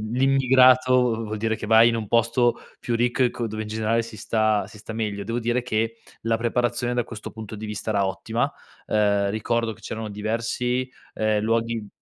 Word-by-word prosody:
l'immigrato 130 -2 +4
v - - -4
vuol 110 0 -4
dire 110 0 0
che 105 - -6
vai 115 +1 +7
in 115 - 0
un 110 -2 -4
posto 115 +1 +2 0.2
più 120 - -3
ricco 120 +2 +1
e 120 - +3
co 120 - -3
dove 110 0 -4
in 105 - -7
generale 110 +1 0
si 115 -2 -10
sta 110 -2 +1
si 105 - -14
sta 110 +2 -8
meglio. 105 -3 -3
Devo 115 +3 -2
dire 120 +1 0
che 115 -1 -1 0.3
la 115 0 +1
preparazione 120 +1 0
da 120 -2 0
questo 110 -3 -8
punto 110 -1 -8
di 110 - -7
vista 105 0 -5
era 100 -2 +2
ottima. 95 -1 -2 0.3
Ehm, 100 -2 +2
ricordo 115 +1 -1
che - - -16
c'erano 110 -1 -5
diversi, 115 +4 -2 0.2
ehm, 110 -1 +1
luoghi 115 -1 -1
115 Hz, 200 wpm, -24 LUFS, 110-120 Hz, 0.3 s, vai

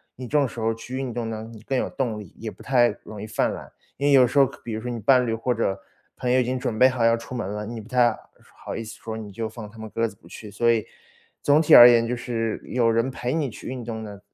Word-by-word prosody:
你 130 - -8
这 150 - +1
种 140 - +3
时 115 -1 -8
候 115 0 +1
去 115 +3 -8
运 130 -2 -3
动 115 -1 -3
呢， 110 0 -5
你 110 - -11
更 130 +4 -2
有 - - -1
动 120 -6 -2
力， 105 -5 -10
也 110 - -5
不 - - -13
太 120 -3 +3
容 105 -2 -9
易 105 - -6
犯 110 - 0
懒。 - - -9 0.3
因 140 - -2
为 145 - +4
有 130 -2 +7
时 140 - -4
候 140 - +7
可 - - -10
比 115 - -6
如 110 - -4
说 125 - -3
你 120 - -4
伴 125 +3 +4
侣 115 - -1
或 115 +3 -1
者 105 -4 0 0.4
朋 125 -1 -2
友 130 - +4
已 - - +3
经 130 +1 -2
准 110 -3 -3
备 130 +3 +7
好 130 -2 -1
要 115 0 +4
出 115 +2 -10
门 120 -6 -3
了， 105 0 -4
你 115 0 -6
不 105 - -15
太 120 -3 +3 0.5
好 - - -5
意 115 - -4
思 110 -2 -9
说， 110 -1 -5
你 105 -2 -8
就 110 +3 -4
放 110 -1 -9
他 115 - -15
们 110 0 -7
鸽 115 +2 0
子 - - -11
不 - - -20
去。 105 -2 -10
所 115 +3 +2
以 115 -2 0 0.6
总 145 +1 +4
体 155 - +3
而 120 0 +12
言， 115 -1 +4
就 125 - -1
是 115 -2 -3
有 120 -2 +1
人 115 +3 +1
陪 125 -1 -3
你 155 -4 0
去 - - -12
运 125 -1 -5
动 110 -1 -5
呢， 100 -2 -9
115 Hz, 325 characters per minute, -24 LUFS, 110-125 Hz, 0.6 s, 而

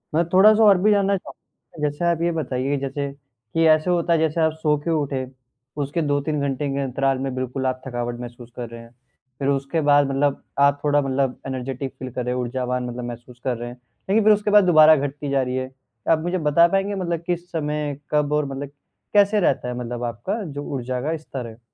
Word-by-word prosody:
मैं 170 - +4
थोड़ा-सा 215 +3 +7
और 200 -3 +7
भी 210 +1 +4
जानना 200 -1 +3
चाहूँगा। 150 -4 -8
जैसे 145 +4 -4
आप 170 -1 +1
ये 170 0 +2
बताइए 140 -3 -1
जैसे 140 +1 -3 0.4
कि 165 0 +3
ऐसे 155 +3 +4
होता 170 -1 +2
है 165 - +3
जैसे 160 +1 +1
आप 160 0 +3
सोके 150 +2 +1
उठे 140 -4 -1 0.6
उसके 145 +4 -1
2-3 145 0 0
घंटे 140 +1 -1
के 140 - -2
अंतराल 135 0 0
में 135 -1 -3
बिल्कुल 130 +1 -3
आप 130 0 -2
थकावट 120 -1 -4
महसूस 120 0 -9
कर 120 -2 -6
रहे 115 0 -9
हैं। 115 0 -15 0.5
फिर 140 - -1
उसके 140 +3 0
बाद 145 -1 +4
मतलब 140 +1 0 0.2
आप 140 0 +4
थोड़ा 145 0 +3
मतलब 135 -1 -1
एनर्जेटिक 130 0 -4
फ़ील 130 -1 -6
कर 125 0 -4
रहे 125 - -1
हैं, 125 - -1
ऊर्जावान 125 0 -2
मतलब 120 +1 -6
महसूस 120 +1 -9
कर 125 -3 -1
रहे 120 +1 -6
हैं। 120 - -10 0.3
लेकिन 215 +2 +3
फिर 215 0 +7
उसके 205 0 0
बाद 210 -1 +7
दोबारा 155 -2 +7
घटती 145 0 -3
जा 135 -1 +2
रही 125 0 -2
है। 130 0 -4 0.4
आप 160 -1 +4
मुझे 175 +3 -1
बता 170 +3 +6
पाएँगे 195 +2 0
मतलब 170 -3 -2
किस 175 0 -3
समय 150 -2 -2
कब 150 -1 +1
और 150 -1 +2
मतलब 140 +1 -5 0.4
कैसे 205 +1 +4
रहता 135 -8 +1
है 125 - -3
मतलब 120 0 -5
आपका 120 - -3
जो 145 -4 -6
ऊर्जा 125 -1 -3
का 160 +4 -1
स्तर 135 -5 -7
है? 115 +1 -12
145 Hz, 220 wpm, -22 LUFS, 130-165 Hz, 0.6 s, थोड़ा-सा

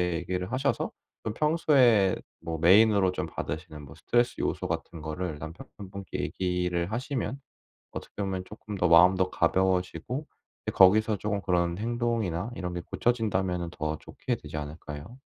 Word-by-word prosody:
얘기를 90 +2 -3
하셔서 135 +2 0 0.3
그 110 - -2
평소에 130 - +4 0.2
뭐 80 -1 -4
메인으로 100 +2 +6
좀 - - -2
받으시는 75 0 -6
뭐 70 -1 -12
스트레스 120 0 +1
요소 - - -1
같은 80 - -4
거를 80 0 -4
남편분 85 +5 -9
분께 100 -1 -6
얘기를 90 -1 -1
하시면 130 +3 -3 0.5
어떻게 - - -8
보면 95 -1 -2
쪼끔 105 +1 -9
더 90 -2 +2
마음도 90 +2 +6
가벼워지고 95 - 0 0.4
이제 - - -1
거기서 105 +3 +6
쪼금 105 0 -2
그런 85 -2 0
행동이나 115 -4 -1
이런 90 -5 -4
게 85 - -3
고쳐진다면은 95 -6 0
더 80 -2 -3
좋게 - - -4
되지 - - -8
않을까요? 75 - -8
95 Hz, 350 characters per minute, -28 LUFS, 85-110 Hz, 0.5 s, 메인으로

